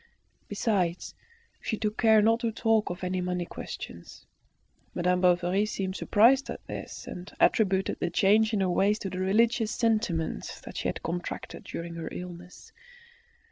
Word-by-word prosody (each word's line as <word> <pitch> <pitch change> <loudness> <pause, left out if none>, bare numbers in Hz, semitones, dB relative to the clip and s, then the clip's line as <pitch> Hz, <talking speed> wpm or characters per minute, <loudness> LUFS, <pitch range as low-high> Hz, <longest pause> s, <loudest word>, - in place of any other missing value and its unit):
Besides, 195 -5 -1 0.5
she 220 - -2
took 210 -1 -2
care 220 -2 +6
not 225 +2 +4
to 230 -1 -1
talk 225 -1 +1
of 175 +1 -6
any 185 0 -1
money 180 -1 -2
questions. 85 - -9 0.7
Madame 180 +1 +1
Bovary 180 +3 +3
seemed 190 -3 -3
surprised 250 +9 +4
at - - -7
this, - - -7
and 180 +2 -8
attributed 195 -3 +2
the 175 - 0
change 210 +5 +3
in 210 -3 0
her 185 - +1
ways 200 +4 +2
to 195 -3 -5
the 185 - -4
religious 220 +4 +2
sentiments 215 - -1
she - - -3
had - - -4
contracted 175 +1 -5
during 170 0 -6
her 165 -1 -5
illness. 180 0 -9
190 Hz, 150 wpm, -28 LUFS, 180-220 Hz, 0.7 s, care